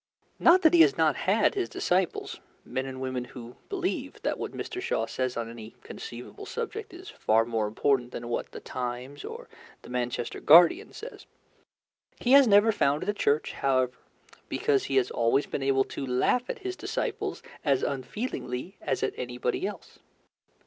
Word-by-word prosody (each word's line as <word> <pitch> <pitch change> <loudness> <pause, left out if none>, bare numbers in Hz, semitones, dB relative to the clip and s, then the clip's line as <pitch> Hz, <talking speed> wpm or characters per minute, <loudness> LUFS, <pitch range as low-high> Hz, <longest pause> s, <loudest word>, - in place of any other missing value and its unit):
Not 355 +2 +6
that 320 - +6
he 340 - +7
has 410 +5 +5
not - - +3
had - - +2
his 390 -4 -2
disciples 180 0 -1 0.3
men 130 +1 -3
and 130 -1 -7
women 130 -1 -3
who 125 -1 -11
believe 370 -2 -3
that - - -1
what - - -4
Mr. 370 - -5
Shaw 475 +4 0
says 130 -2 -2
on 115 -1 -2
any 115 -1 -10
conceivable 120 +1 -9
subject - - -5
is - - -10
far 110 +1 +2
more 115 -2 -1
important 125 +3 +1
than 120 - -6
what 120 - -3
The - - -8
Times 125 +3 -5
or 470 +1 -8 0.4
the - - -11
Manchester 125 -1 -2
Guardian 175 - +6
says. 485 - -10 0.9
He 245 - 0
has 275 -1 +8
never 205 +2 +6
founded 145 -3 +1
a - - +2
church, 150 -7 +1
however, 130 -2 +1 0.6
because 140 -2 +1
he 135 - -2
has 130 -2 +3
always 120 +4 +2
been - - -4
able 135 0 +3
to - - -6
laugh 135 - +1
at - - -3
his 375 -1 -2
disciples - - -3 0.2
as 140 -4 +2
unfeelingly 140 - -4
as 135 - -1
at 130 - 0
anybody 125 0 -2
else. - - -9
135 Hz, 170 wpm, -28 LUFS, -, 0.9 s, has